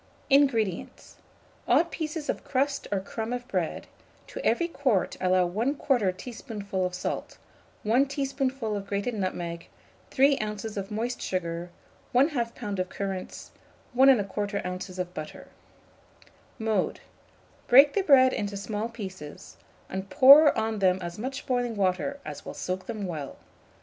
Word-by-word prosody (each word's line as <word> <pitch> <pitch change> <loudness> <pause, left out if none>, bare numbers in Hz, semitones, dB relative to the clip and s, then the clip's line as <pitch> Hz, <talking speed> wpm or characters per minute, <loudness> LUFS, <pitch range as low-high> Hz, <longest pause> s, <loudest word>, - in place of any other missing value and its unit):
INGREDIENTS. 235 -10 +1 0.5
Odd 340 - +3
pieces 310 -1 -4
of - - -2
crust 275 +1 -1
or 200 - +1
crumb 220 +4 -5
of 245 0 -4
bread; - - -2 0.4
to - - -8
every 340 - +2
quart 260 - 0
allow 185 -1 +3
1/2 225 -1 0
teaspoonful 205 -5 -4
of 180 - -7
salt, - - -4 0.5
1 245 +6 +3
teaspoonful 270 -5 -2
of 200 -1 -5
grated 200 +4 -2
nutmeg, 175 -4 -4 0.4
3 275 +1 +4
oz. 210 0 -4
of 195 -1 -4
moist 230 +3 -3
sugar, 170 -1 -3 0.5
1/2 275 +6 +5
lb. 230 -5 -3
of 185 0 -1
currants, 195 -2 -5 0.4
1 260 +2 +6
1/4 205 -4 +1 0.2
oz. 185 - -10
of 180 -1 -4
butter. 155 -3 -8 1.1
Mode. 220 -5 -1 0.7
Break 275 +3 +8
the 400 - +2
bread 265 -7 +6
into 205 -1 -3
small 210 +2 -3
pieces, 190 -10 -9 0.3
and 190 +1 -5
pour 285 +2 +8
on 220 -1 -1
them 185 -1 +3
as 175 +2 -6
much 265 +4 -5
boiling 245 -2 -1
water 200 +9 0
as - - -7
will - - -8
soak 185 +1 -4
them 215 -4 -4
well. 155 -6 -5
215 Hz, 140 wpm, -27 LUFS, 190-260 Hz, 1.1 s, Break